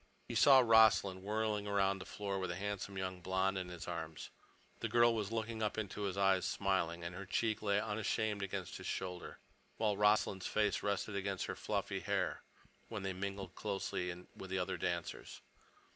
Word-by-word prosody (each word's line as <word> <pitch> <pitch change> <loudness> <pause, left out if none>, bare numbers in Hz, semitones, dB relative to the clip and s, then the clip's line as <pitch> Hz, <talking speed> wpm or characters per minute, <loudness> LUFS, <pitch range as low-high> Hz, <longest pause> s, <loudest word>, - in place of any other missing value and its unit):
He - - -5
saw 135 -2 +8
Rossland 110 -5 +5
whirling 105 0 -1
round 100 -1 +2
the - - -8
floor 100 -1 -3
with 95 -1 -2
a 85 - -2
handsome, 100 0 -4
young 95 -1 -3
blonde 95 +2 +1
in 90 -1 -5
his 90 -1 -7
arms. 80 -2 -5 0.5
The - - -2
girl 120 0 +5
was 105 -2 -2
looking 115 0 -2
up 105 -1 0
into 105 -1 -3
his 95 -1 -2
eyes, 95 -2 +4
smiling, 90 -4 0
and 85 +1 -4
her 95 +1 -7
cheek 110 +3 0
lay 100 -1 +2
unashamed 105 0 -1
against 95 -2 -4
his - - -7
shoulder, 90 -1 -4 0.4
while 105 -2 +2
Rossland's 105 -2 +3
face 105 -2 +1
rested 100 0 -1
against 100 -1 -1
her - - -4
fluffy - - -2
hair - - -1 0.5
when 105 -4 -5
they 95 -1 -1
mingled 95 -1 -4
closely 90 -3 -3
with 95 - -8
the 95 - -1
other 90 0 -1
dancers. - - -3
100 Hz, 180 wpm, -36 LUFS, 95-105 Hz, 0.5 s, saw